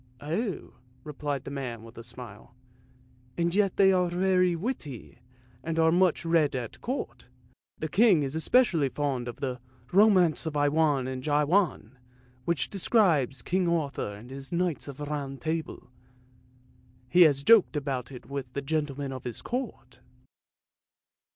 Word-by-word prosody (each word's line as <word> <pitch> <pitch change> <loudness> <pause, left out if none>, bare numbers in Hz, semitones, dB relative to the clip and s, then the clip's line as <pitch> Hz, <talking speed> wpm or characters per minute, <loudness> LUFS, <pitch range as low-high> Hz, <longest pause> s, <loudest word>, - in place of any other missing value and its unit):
" - - -29
Oh," 170 - -3 0.3
replied 145 -2 -4
the - - -7
man 125 -5 -5
with 115 +1 -13
a 115 - -8
smile, 120 -1 -10 0.4
" 125 0 -31
and 170 0 0
yet 200 -1 +2
they 195 -1 +6
are 180 -2 +2
very 180 0 +2
witty, 165 - -6 0.4
and 165 0 -3
are 160 0 +4
much 175 -1 +2
read 165 -4 +2
at 120 -3 -6
Court. 230 - -5 0.5
The 155 - -3
King 190 -2 +4
is 135 +2 -3
especially 165 - +3
fond 135 -4 -2
of 120 - -5
the 130 -2 -3 0.2
' 125 0 -29
Romance 185 -7 +4
of 150 -2 -3
I 145 0 +3
wain 145 -4 +1
and 130 -1 -4
Jawain,' 150 - +1 0.5
which 160 -7 0
describes 170 - +2
King 185 0 0
Arthur 145 -10 -2
and 115 +5 -12
his 135 0 -8
knights 175 -3 -1
of 140 -2 -8
the 150 - -5
Round 140 -2 -4
Table. 160 -5 -4 1.2
He 175 +6 +4
has 145 -5 +5
joked 210 -5 +5
about 135 -3 -3
it 125 - -10
with 140 -2 -6
the 140 - -3
gentlemen 145 -2 -2
of 130 - -7
his 120 -2 -6
Court." 220 - -5
145 Hz, 160 wpm, -28 LUFS, 130-175 Hz, 1.2 s, they